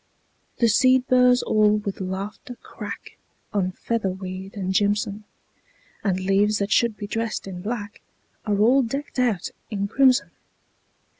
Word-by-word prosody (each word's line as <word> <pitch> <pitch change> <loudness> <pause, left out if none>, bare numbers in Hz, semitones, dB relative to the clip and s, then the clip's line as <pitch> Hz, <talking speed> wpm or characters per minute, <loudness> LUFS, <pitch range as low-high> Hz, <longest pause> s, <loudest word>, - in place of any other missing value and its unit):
The 235 - +3
seed 255 +3 +4
burrs 250 -1 +4
all 215 -1 +3
with 200 -2 -5
laughter 195 +7 -5
crack - - -9 0.3
On 190 -3 0
featherweed 190 -3 -4
and 190 -1 -2
jimson; 205 +1 0 0.8
And 190 -3 0
leaves 195 +3 +2
that 200 +1 -2
should 235 -2 +2
be 205 - -5
dressed 225 +2 -3
in 185 -2 -7
black 205 0 -5 0.5
Are 205 -1 +1
all 245 +6 +5
decked 275 +3 -4
out 225 -8 0 0.2
in 200 -2 -2
crimson. 260 +4 +3
210 Hz, 135 wpm, -24 LUFS, 195-240 Hz, 0.8 s, all